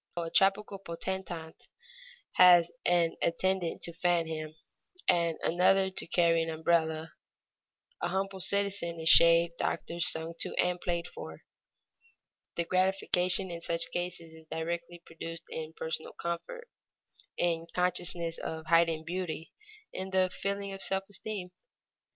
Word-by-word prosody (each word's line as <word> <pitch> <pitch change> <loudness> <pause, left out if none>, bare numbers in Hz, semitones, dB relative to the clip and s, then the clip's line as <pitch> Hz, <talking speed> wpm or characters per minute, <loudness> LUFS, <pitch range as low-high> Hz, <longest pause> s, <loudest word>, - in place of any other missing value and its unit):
A 165 -1 -3
tropical 195 +1 +2
potentate 170 -2 -6 0.7
has 175 -2 +7 0.2
an 175 -2 +2
attendant 185 0 0
to 170 - +2
fan 175 0 +1
him, 155 -1 -6 0.5
and 170 -2 +2
another 190 +2 +3
to 185 - -3
carry 165 -1 +3
an 165 - -2
umbrella; 160 0 0 0.9
a - - 0
humble 195 0 -2
citizen 195 -3 0
is 160 0 +4
shaved, 170 0 +6
doctored, 170 0 -2
sung 165 -1 +2
to, - - -2
and 180 0 +1
played 170 -1 -2
for. 80 0 -10 1.1
The 170 - 0
gratification 185 0 +2
in 170 0 -6
such 165 0 0
cases 175 -2 -4
is 160 0 -15
directly 170 +1 -4
produced 165 0 -7
in 160 0 -5
personal 160 0 -4
comfort, 320 - -5 0.7
in 170 -2 +1
the 165 - -13
consciousness 175 -2 0
of 160 0 -5
heightened 165 -1 +3
beauty, 170 -2 -4 0.4
in 190 0 -4
the 185 -1 +2
feeling 200 0 -3
of 195 - -6
self 195 0 +1
esteem. 200 -3 -4
170 Hz, 135 wpm, -30 LUFS, 165-185 Hz, 1.1 s, has